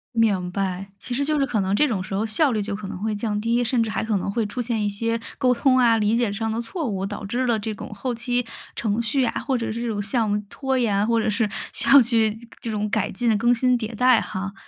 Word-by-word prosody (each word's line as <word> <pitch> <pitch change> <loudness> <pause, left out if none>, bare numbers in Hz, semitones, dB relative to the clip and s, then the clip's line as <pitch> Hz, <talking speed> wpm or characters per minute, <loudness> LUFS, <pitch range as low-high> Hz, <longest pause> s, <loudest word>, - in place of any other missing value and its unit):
明 195 -6 +2
白， 195 0 -3
其 245 - -6
实 280 +3 0
就 305 0 +1
是 275 - +3
可 230 -5 0
能 190 +1 -1
这 300 +8 +4
种 195 -7 -2
时 185 - -8
候 205 +3 0
效 250 +6 +3
率 215 - 0
就 200 0 -3
可 205 -1 -7
能 195 - -6
会 215 -1 -1
降 210 -1 -2
低， 235 +2 +1
甚 240 0 +1
至 225 - 0
还 - - -2
可 220 -2 0
能 190 - -3
会 225 +1 0
出 225 +5 -4
现 230 -3 -1
一 205 - +1
些 230 +3 -1 0.2
沟 250 -1 +3
通 255 +2 +3
啊、 235 -3 +5
理 215 +2 +2
解 235 -4 +1
上 220 +2 -2
的 225 - -2
错 300 +8 -4
误， 195 -5 -2
导 205 0 -6
致 245 +5 -1
了 235 -2 +2
这种 215 -1 -5
后 250 +5 -3
期 245 +1 -1 0.3
程 220 0 0
序 255 +3 +1
啊， - - -1
或 265 -2 0
者 230 -2 -3
是 230 - -4
这 240 - -2
种 - - -1
这 - - -2
种 205 - -1
项 220 +1 +1
目 205 0 0
拖 265 +2 -2
延， 210 -5 +1
或 230 0 +2
者 220 - 0
是 215 0 0 0.2
需 - - -1
要 280 -1 +9
去 225 -2 +2 0.3
这 230 - -4
种 210 0 -2
改 210 -1 0
进 235 +3 0
的 220 - +4
更 240 +3 +3
新 250 +1 +2
迭 225 -1 -5
代 250 0 +5
哈。 195 +1 -5
225 Hz, 310 characters per minute, -23 LUFS, 205-245 Hz, 0.3 s, 要